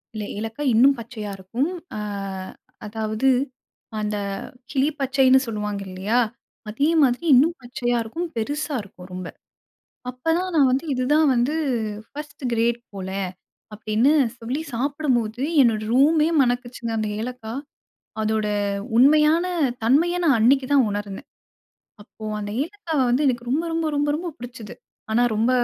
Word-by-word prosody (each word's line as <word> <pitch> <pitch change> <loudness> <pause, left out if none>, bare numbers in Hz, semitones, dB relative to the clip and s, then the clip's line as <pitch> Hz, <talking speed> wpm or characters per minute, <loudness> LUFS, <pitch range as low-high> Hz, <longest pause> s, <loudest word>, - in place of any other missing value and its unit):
இல்ல 215 - -3
ஏலக்காய் 225 +5 -2
இன்னும் 270 +5 +6
பச்சையா 220 -3 -6
இருக்கும். 230 - -2 0.3
அ - - -3 0.9
அதாவது 215 +3 -2 0.7
அந்த 210 0 -2 0.6
கிளி 275 +1 +2
பச்சைன்னு 265 0 +4
சொல்லுவாங்க 210 -2 -3
இல்லையா? 195 +6 0 0.5
அதே 280 +8 +1
மாதிரி 255 +3 +2
இன்னும் 300 +7 +5
பச்சையா 245 0 -1
இருக்கும், 335 +11 -4
பெருசா 290 +6 -2
இருக்கும். 185 -2 -13
ரொம்ப. 180 -1 -5 0.8
அப்போ 250 +6 -4
தான் 370 0 -2
நான் 280 -4 +5
வந்து 270 +5 0
இதுதான் 290 +5 +3
வந்து 245 +5 +1 0.6
ஃபர்ஸ்ட் 295 -1 -9
கிரேட் 235 +1 +1 0.2
போல! 190 -1 -5 0.6
அப்டின்னு 215 +5 +2 0.3
சொல்லி 250 +6 -3
சாப்பிடும்போது, 255 -3 0 0.2
என்னோட 225 -4 +3
ரூமே 300 +4 +5
மணக்குச்சுங்க 245 -2 -1
அந்த 215 -1 -1
ஏலக்கா. 230 -1 -5 0.7
அதோட 215 0 0 0.5
உண்மையான 305 +6 +5 0.4
தன்மைய 320 +10 +3
நான் 280 -7 +5
அன்னைக்கு 260 +4 +4
தான் 270 -4 +5
உணர்ந்தேன். 205 +5 -5 0.7
அப்போ 215 +1 -13 0.2
அந்த 205 - -5
ஏலக்காவை 330 -7 -2
வந்து, 255 +5 +2
எனக்கு 240 -1 -2
ரொம்ப 305 +6 +1
ரொம்ப 325 0 0
ரொம்ப 290 0 +1
ரொம்ப 345 +2 -4
புடிச்சது. 240 -3 -9 0.4
ஆனா 240 - +3
ரொம்ப 225 +3 +2
245 Hz, 130 wpm, -23 LUFS, 220-285 Hz, 0.9 s, இன்னும்